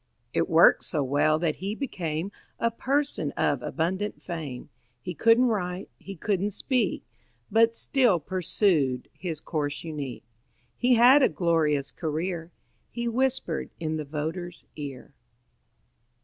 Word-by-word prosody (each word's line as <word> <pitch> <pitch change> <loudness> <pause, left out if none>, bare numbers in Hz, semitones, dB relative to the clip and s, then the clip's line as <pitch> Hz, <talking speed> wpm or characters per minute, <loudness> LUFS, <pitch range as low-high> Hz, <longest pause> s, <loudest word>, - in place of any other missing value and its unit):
It - - +1
worked - - +6
so 145 - -1
well 145 +3 +2
that 160 -2 -1
he 200 +3 -3
became 180 - -3 0.3
A 230 - +1
person 270 - -1
of 145 -3 +1
abundant 185 +9 -2
fame. 155 -8 -6 0.3
He 180 - -5
couldn't 230 - +4
write; 190 -5 -2
he 195 - -8
couldn't 200 +3 0
speak, 235 0 0 0.5
But 230 +1 +4
still 245 -11 +3
pursued 165 - 0
his 165 -5 -5
course 145 -3 -3
unique. 150 -6 -5 0.5
He 250 0 +3
had 250 +5 +7
a - - +5
glorious 155 -5 +1
career 165 +1 -3 0.4
He 235 0 -3
whispered 245 -8 0
in 155 -1 -2
the 155 - -3
voter's 160 +4 -5
ear. 140 -4 -8
175 Hz, 130 wpm, -27 LUFS, 155-220 Hz, 0.5 s, had